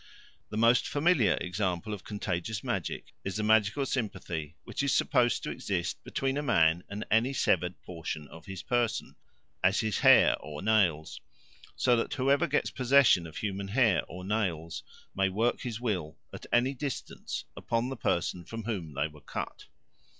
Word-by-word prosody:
The 105 - -5
most 115 +2 +4
familiar 145 - +3
example 90 +2 -2
of 100 - -7
Contagious 100 0 -3
Magic - - -3
is 95 - -4
the 105 - -1
magical 110 +5 +3
sympathy 90 - -3
which - - -4
is 140 -2 +2
supposed 125 -4 +2
to - - -3
exist 90 -4 -3
between 135 0 -1
a - - 0
man 85 - +3
and 100 +2 -5
any 115 +5 +3
severed 90 -7 +1
portion 80 -3 -6
of 80 -2 -13
his 95 -2 -6
person, 120 -2 -1 0.5
as - - +4
his 110 -1 -1
hair - - +7
or 75 +2 -8
nails; 95 -8 +1 0.5
so 125 -1 +3
that 115 - -1
whoever 140 +1 +2
gets - - 0
possession 130 -9 +4
of 80 - -10
human 100 -2 -3
hair 110 -2 +3
or 90 +2 -8
nails 90 -6 -2 0.3
may 95 0 +2
work 115 +6 0
his 115 -3 -4
will, 90 -10 -2 0.2
at - - -9
any 125 +3 +3
distance, 135 0 -5
upon 115 +2 -1
the 135 - -4
person 85 -5 -1
from 115 +6 -7
whom 90 -10 -4
they 70 +2 +1
were 75 -1 -15
cut. - - -6
105 Hz, 165 wpm, -29 LUFS, 85-120 Hz, 0.5 s, hair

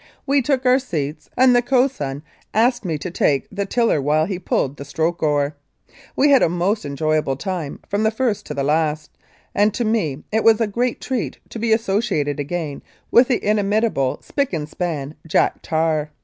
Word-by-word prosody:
We 280 0 +3
took 265 0 0
our 255 +1 +5
seats, 155 - -4
and 255 0 +6
the 245 - +5
cox 260 +1 +2
swain 140 +1 -4 0.3
asked 240 +2 +3
me 165 -5 -2
to 175 +4 -6
take 140 -5 +1
the 200 0 -3
tiller 230 - +2
while 150 +3 +2
he 185 0 -4
pulled 145 -5 -1
the - - -7
stroke 160 +4 -2
oar. 145 -1 +1 0.6
We 285 +2 +4
had 275 - +6
a - - +4
most 180 +4 0
enjoyable 150 -1 0
time 170 -2 -4
from 215 +2 +1
first 220 -1 -1
to 150 - -5
last, 150 +1 0 0.4
and 210 +1 +2
to 240 - -1
me 165 -11 -1
it 220 +1 +1
was 225 -1 +5
a 225 - +2
great 240 +4 -1
treat 255 -3 -3
to 230 - -7
be 225 0 0
associated 195 -9 0
again 150 0 -4 0.3
with 245 +1 +6
the 250 - 0
inimitable 210 - +1
spick 280 -7 -2
and 150 -3 -2
span 150 -4 -4
Jack 160 - +1
Tar. 155 -2 0
185 Hz, 185 wpm, -21 LUFS, 150-230 Hz, 0.6 s, and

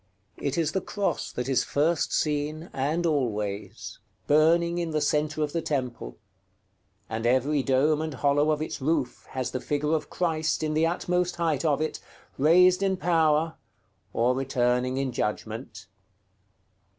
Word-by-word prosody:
It 140 +1 -2
is 160 -2 +1
the 190 - -1
Cross 200 +2 -2
that 125 0 -3
is 135 -2 +2
first 155 +3 +1
seen, 150 +2 -1
and 150 +6 -1
always, 105 -9 -2 0.3
burning 170 +3 +3
in 170 -1 -2
the 155 -1 0
centre 150 +1 0
of 150 - -3
the 165 - 0
temple; 125 - -3 0.9
and 115 +1 -2
every 135 +4 +2
dome 140 +4 +2
and 155 -3 -4
hollow 145 +1 +2
of 155 0 +1
its 155 - -6
roof 145 -3 -1
has 130 -1 -2
the 130 - -3
figure 150 +2 -1
of 160 - -1
Christ 160 -3 -1
in 155 0 -1
the 160 +2 +3
utmost 180 +1 -1
height 165 -4 0
of 150 -2 +1
it, 155 - -2 0.4
raised 180 +5 +5
in 190 -1 +1
power, 165 -2 +2 0.5
or 120 +2 +2
returning 125 -1 0
in 135 -1 -1
judgment. 110 -2 -4
150 Hz, 150 wpm, -26 LUFS, 130-160 Hz, 0.9 s, raised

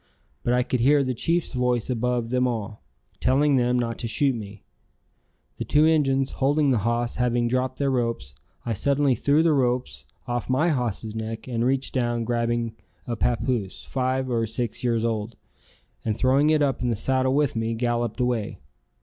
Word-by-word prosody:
But 120 - 0
I 125 - +2
could 125 - -1
hear 140 +4 +4
the 130 -1 -1
chief's 165 +7 -1
voice 125 -2 0
above 125 -1 -1
them 125 0 +2
all, 110 -3 -4 0.4
telling 140 +2 +3
them 125 -1 +2
not 115 -2 -2
to 115 - -3
shoot 135 +4 +2
me. 105 -3 -8 0.9
The - - -3
two 150 +1 +3
Injuns 135 -4 +2
holding 145 +1 +2
the 120 - +2
hoss 120 +3 -1
having 120 -1 +1
dropped 130 +1 -1
their 140 -1 +1
ropes, 115 - -2 0.3
I 115 - -1
suddenly 140 +5 +2
threw 145 +6 +2
the 165 -2 +4
ropes 125 -2 -1 0.2
off 120 0 -3
my 145 +7 +2
hoss's 115 -6 -2
neck 110 +1 -5
and 120 -2 -1
reaching 130 +1 0
down 120 -1 -1
grabbed 120 0 -1 0.3
a 120 - -3
papoose, 115 -3 -1
five 130 0 -1
or 115 -2 0
six 115 +1 -3
years 115 -2 +1
old, 110 -1 -2 0.7
and 110 -1 -1
throwing 135 +4 +3
it 155 -1 +3
up 135 -4 0
in 125 - 0
the 115 - +1
saddle 130 +4 +1
with 145 -4 +1
me, 115 0 -1
galloped 120 +1 -1
away. 125 -4 -1
125 Hz, 180 wpm, -25 LUFS, 115-135 Hz, 0.9 s, hear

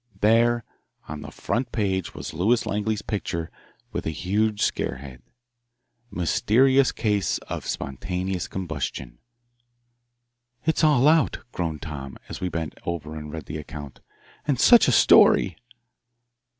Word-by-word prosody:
There 115 +2 +4 0.4
on 75 0 -6
the - - -8
front 120 0 -3
page 95 -5 -1
was - - -6
Lewis 110 +9 +2
Langley's 105 +1 -1
picture 85 -5 -3 0.4
with - - -4
a - - +1
huge 105 +6 0
scare - - -1
head: 65 -1 -11 0.9
MYSTERIOUS 130 - +3
CASE 105 -3 0
OF - - -5
SPONTANEOUS 90 +6 -3
COMBUSTION 75 -9 -5 1.5
"It's 160 +1 +1
all 145 -3 +5
out," 160 0 +4
groaned 80 -4 -3
Tom, 70 -4 -7
as - - -7
we 90 - -1
bent 80 -4 -5
over 80 -3 -4
to 75 -1 -7
read 80 -1 -7
the 80 - -5
account. 75 -2 -9 0.5
"And 135 -4 +1
such 240 -1 +7
a - - +4
story!" 95 -6 +6
95 Hz, 130 wpm, -24 LUFS, 80-115 Hz, 1.5 s, such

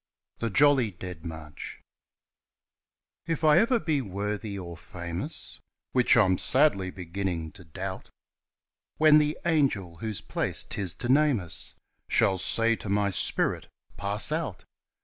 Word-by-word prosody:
The 115 - -1
Jolly 135 -1 +4
Dead 90 -3 -9
March 80 -3 -8 1.5
F 165 -1 -2
I 155 +2 +6
ever 235 +3 +3
be 155 -8 0
worthy 105 0 -4
or 85 -3 -7
famous 85 - -6 0.3
Which 125 -2 +4
I'm 95 -5 +4
sadly 130 -10 +3
beginning 90 -2 -4
to 100 -2 -14
doubt 95 +3 -6 0.9
When 155 -1 +7
the 150 0 0
angel 130 - +1
whose 110 +2 -4
place - - -2
'tis 95 -4 -4
to 120 - -4
name 145 -2 +4
us 85 -3 -4 0.3
Shall 95 -1 +3
say 115 +5 +2
to 105 - -7
my 100 0 +2
spirit, - - 0 0.3
"Pass 100 +6 0
out!" 155 - -3
100 Hz, 130 wpm, -27 LUFS, 90-145 Hz, 1.5 s, When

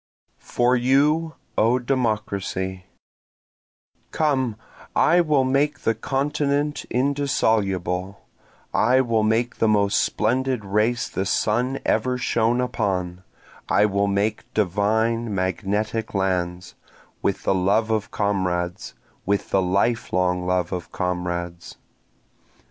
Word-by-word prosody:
For 125 +1 +1
You, 145 +6 +2 0.2
O 115 +3 +4
Democracy 105 -7 -2 1.2
Come, 130 -7 0 0.4
I 175 +2 +4
will 150 -5 +2
make 140 +3 +1
the 115 - +1
continent 145 +4 -1
indissoluble, 105 -9 0 0.5
I 130 +1 +4
will 115 -3 +1
make 110 +3 0
the 110 - +2
most 100 -1 +3
splendid 125 0 0
race 105 +4 +1
the 95 - -3
sun 120 +7 0
ever 125 -1 +1
shone 120 0 +1
upon, 95 -7 -2 0.5
I 105 - +4
will 100 0 +1
make 100 +2 -1
divine 110 +3 +1
magnetic 105 +4 -2
lands, 90 -2 -1 0.5
With 100 -1 -1
the - - +2
love 100 +4 +1
of 110 -1 -1
comrades, 90 -3 -2 0.3
With 100 0 0
the 95 - +3
life 100 +6 0
long 90 0 0
love 90 -1 0
of 90 -1 -5
comrades. 90 -1 -3
105 Hz, 110 wpm, -23 LUFS, 95-125 Hz, 1.2 s, O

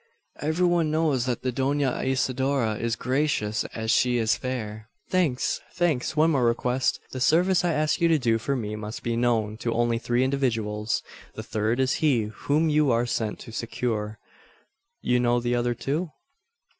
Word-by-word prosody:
"Every 160 +4 +1
one 175 -3 +2
knows 150 -5 +1
that 125 -2 -2
the 130 - 0
Dona 135 +1 0
Isidora 130 -2 0
is 115 0 -1
gracious 125 -6 0
as 110 0 -3
she 125 0 +3
is 115 -1 +2
fair." 110 -4 -5 0.2
"Thanks 165 -9 +1
thanks! 160 -5 0
One 160 +2 +4
more 135 -5 +2
request. 125 +2 +1
The 130 - -5
service 175 +7 +3
I 175 -2 +1
ask 155 +1 0
you 170 - +5
to 165 -1 +4
do 115 -5 +1
for 140 +5 -1
me 105 -4 -3
must 110 +2 -7
be 120 -1 -1
known 115 -3 0
to 115 0 -2
only 120 0 +1
three 120 +1 +1
individuals. 115 -6 -1 0.3
The - - -6
third 110 +3 -1
is 130 -1 +2
he 135 -8 +3
whom 150 +8 +1
you 150 -2 +3
are 120 0 +2
sent 110 -3 -2
to - - -10
succour. 115 -2 -3 0.9
You 125 - +2
know 120 0 +2
the 120 0 -1
other 120 0 0
two?" 145 +9 -2
125 Hz, 175 wpm, -26 LUFS, 115-145 Hz, 0.9 s, you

